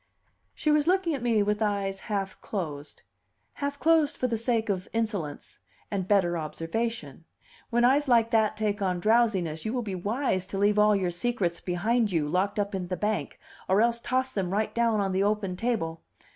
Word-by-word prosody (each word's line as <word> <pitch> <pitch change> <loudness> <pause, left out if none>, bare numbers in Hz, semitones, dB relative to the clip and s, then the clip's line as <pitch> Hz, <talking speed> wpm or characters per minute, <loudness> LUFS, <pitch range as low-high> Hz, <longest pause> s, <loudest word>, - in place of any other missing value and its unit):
She 305 - +1
was 300 0 +3
looking 365 -2 +2
at 275 - -3
me 230 -3 +2
with 210 +1 -1
eyes 200 -2 -1
half 195 -3 -4
closed; 150 -8 -5 0.5
half 285 0 -4
closed 320 0 +3
for - - -1
the 235 -2 0
sake 225 0 0
of 190 -2 -2
insolence 210 -10 -3 0.3
and 190 -3 -2
better 175 -4 +2
observation; 165 - -4 0.4
when 240 0 +3
eyes 280 +3 +3
like 230 -2 +4
that 215 -2 +2
take 210 -1 -1
on 180 -2 0
drowsiness, 195 -7 +2
you 220 - -2
will 250 -2 -1
be 200 -3 -4
wise 190 0 -1
to 195 - -5
leave 205 +1 +3
all 210 0 +5
your 185 -3 0
secrets 175 -3 -1
behind 215 +5 0
you, 160 -4 0
locked 185 +7 0
up 205 0 -1
in 185 -2 -3
the 185 0 -3
bank, 210 0 -2 0.3
or 190 +2 +4
else 235 +1 +2
toss 260 +2 -1
them 195 -6 -2
right 210 +3 -1
down 230 -2 +2
on 195 -1 0
the 190 +1 +1
open 200 -2 0
table. 180 -7 -2
210 Hz, 190 wpm, -27 LUFS, 185-235 Hz, 0.5 s, all